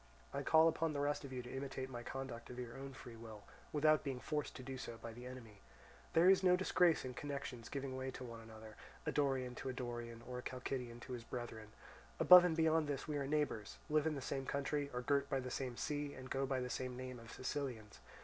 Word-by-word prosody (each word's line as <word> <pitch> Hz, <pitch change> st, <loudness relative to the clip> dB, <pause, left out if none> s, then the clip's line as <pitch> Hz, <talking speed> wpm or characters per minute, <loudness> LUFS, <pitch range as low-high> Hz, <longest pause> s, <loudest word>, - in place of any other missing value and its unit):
I -, -, -1 dB
call 160 Hz, +1 st, +6 dB
upon 165 Hz, -1 st, +1 dB
the 145 Hz, -, -1 dB
rest 145 Hz, +1 st, +1 dB
of 140 Hz, -, -7 dB
you 125 Hz, -1 st, -3 dB
to 125 Hz, +2 st, -7 dB
imitate 135 Hz, -1 st, -3 dB
my 120 Hz, -2 st, -6 dB
conduct 125 Hz, -1 st, -5 dB
of 125 Hz, -, -7 dB
your 120 Hz, -2 st, -5 dB
own 135 Hz, 0 st, -6 dB
free 120 Hz, -2 st, -9 dB
will, 110 Hz, -2 st, -9 dB, 0.3 s
without 155 Hz, +1 st, +4 dB
being 135 Hz, -4 st, -2 dB
forced 150 Hz, +2 st, -2 dB
to 130 Hz, -, -7 dB
do 135 Hz, +1 st, -5 dB
so 120 Hz, -3 st, -6 dB
by 115 Hz, 0 st, -7 dB
the 120 Hz, +2 st, -8 dB
enemy. 115 Hz, -5 st, -10 dB, 0.5 s
There 165 Hz, +2 st, +6 dB
is 190 Hz, 0 st, +7 dB
no 180 Hz, -1 st, +6 dB
disgrace 180 Hz, -4 st, +4 dB
in 130 Hz, -, -4 dB
connections 140 Hz, -4 st, -5 dB
giving 135 Hz, -2 st, -3 dB
way 130 Hz, 0 st, -2 dB
to 130 Hz, 0 st, -6 dB
one 115 Hz, -2 st, -7 dB
another, 110 Hz, -1 st, -11 dB, 0.3 s
a -, -, +1 dB
Dorian 135 Hz, -3 st, +1 dB
to 135 Hz, -, -3 dB
a -, -, -2 dB
Dorian, 120 Hz, -2 st, -5 dB
or 125 Hz, 0 st, -4 dB
a -, -, -5 dB
Chalcidian 125 Hz, -2 st, -4 dB
to 130 Hz, -, -6 dB
his 120 Hz, -2 st, -5 dB
brethren; 115 Hz, -3 st, -5 dB, 0.5 s
above 180 Hz, 0 st, +11 dB
and 170 Hz, -2 st, +2 dB
beyond 160 Hz, -1 st, +4 dB
this 140 Hz, -2 st, -2 dB
we 150 Hz, -1 st, -1 dB
are 140 Hz, -, -1 dB
neighbours, 145 Hz, -8 st, 0 dB
live 155 Hz, 0 st, +4 dB
in 155 Hz, -, 0 dB
the 140 Hz, -, -4 dB
same 135 Hz, +1 st, -3 dB
country, 140 Hz, +1 st, 0 dB
are 125 Hz, -, -2 dB
girt 140 Hz, +1 st, +2 dB
by 135 Hz, -, +1 dB
the 125 Hz, -1 st, -5 dB
same 125 Hz, -2 st, -3 dB
sea, 145 Hz, -1 st, -2 dB
and 130 Hz, 0 st, -9 dB
go 135 Hz, 0 st, +1 dB
by 130 Hz, -1 st, +1 dB
the 125 Hz, -, -2 dB
same 125 Hz, -1 st, -3 dB
name 130 Hz, -1 st, -5 dB
of 115 Hz, -1 st, -11 dB
Sicilians. 130 Hz, -6 st, -4 dB
130 Hz, 240 wpm, -38 LUFS, 120-145 Hz, 0.5 s, above